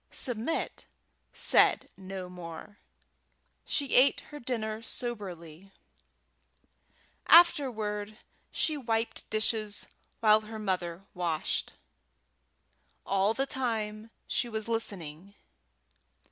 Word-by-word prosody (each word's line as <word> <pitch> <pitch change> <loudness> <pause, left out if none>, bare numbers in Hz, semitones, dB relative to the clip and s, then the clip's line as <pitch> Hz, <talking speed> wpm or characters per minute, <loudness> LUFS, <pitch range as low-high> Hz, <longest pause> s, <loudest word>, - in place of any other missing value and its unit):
Submit 245 +4 -3 0.5
said - - +4
no 190 -1 -7
more. 180 +3 -10 0.9
She 280 -2 -1
ate 270 +3 +5
her 295 - -8
dinner 220 -4 -3
soberly. 195 -7 -4 1.6
Afterward 220 -11 +4 0.3
she 310 -2 0
wiped 230 -3 -2
dishes 215 -1 +2 0.3
while 215 -1 +5
her 220 +1 -8
mother 185 -3 -2
washed. 170 -4 -2 1.3
All 195 +3 +2
the 270 - 0
time 220 -5 -3 0.2
she 240 - -1
was 220 -1 -1
listening. 195 -5 -3
215 Hz, 85 wpm, -30 LUFS, 190-235 Hz, 1.6 s, ate